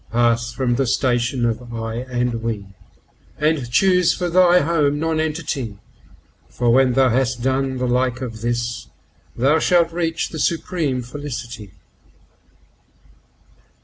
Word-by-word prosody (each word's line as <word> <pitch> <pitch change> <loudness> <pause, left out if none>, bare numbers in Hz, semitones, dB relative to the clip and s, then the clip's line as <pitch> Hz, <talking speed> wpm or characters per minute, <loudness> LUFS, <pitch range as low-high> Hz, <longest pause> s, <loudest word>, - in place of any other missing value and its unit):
Pass 120 0 +1
from 125 -3 -1
the 135 -1 +1
station 120 0 +1
of 120 +1 -3
"I" 115 -1 -4
and 125 -2 -2
"We," 110 -3 -3 0.7
and 150 -5 0
choose 180 +6 +3
for 180 -1 -2
thy 180 0 +5
home 145 -2 +1
Nonentity, 155 -8 -2 0.7
For 120 -1 0
when 130 0 +4
thou 130 0 +4
has 125 +1 +1
done 130 +2 -1
the 125 - -1
like 125 0 0
of 115 -4 -6
this, 120 0 -2 0.5
thou 140 +6 +3
shalt 170 0 +3
reach 165 -1 -1
the 160 - -7
supreme 155 -6 -1
Felicity. 120 -6 -7
130 Hz, 125 wpm, -20 LUFS, 120-155 Hz, 0.7 s, thy